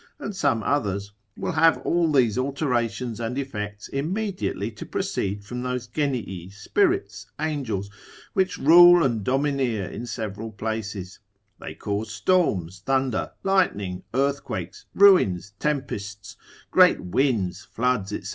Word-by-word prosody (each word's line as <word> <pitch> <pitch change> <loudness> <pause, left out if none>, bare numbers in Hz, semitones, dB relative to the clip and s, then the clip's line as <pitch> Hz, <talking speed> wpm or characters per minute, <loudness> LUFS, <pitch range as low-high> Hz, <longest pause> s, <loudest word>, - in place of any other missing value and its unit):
and 205 - -6
some 140 - +1
others, 100 -7 -1 0.3
will - - -2
have 165 0 +4
all 170 -2 +2
these 125 -7 +3
alterations 125 -4 -1
and 120 +2 -3
effects 105 -7 -5
immediately 175 - -2
to 110 - -9
proceed 100 +1 -3
from 125 +3 -5
those 125 -1 -3
genii, 120 - -3
spirits, 370 - 0
angels, 130 -11 -2 0.5
which 190 -2 +1
rule 175 +3 +8
and 115 -6 0
domineer 130 -4 0
in 120 +5 -7
several 110 0 -5
places; 105 -3 -5 0.4
they - - -8
cause 105 +1 -3
storms, 105 - +1
thunder, 130 -3 0
lightning, 105 - +1
earthquakes, 140 +1 -2
ruins, 100 - +5
tempests, 105 -9 -3 0.4
great - - +6
winds, 95 -3 0
floods, 120 -4 -1
&c. 105 - -5
120 Hz, 120 wpm, -24 LUFS, 105-145 Hz, 0.5 s, rule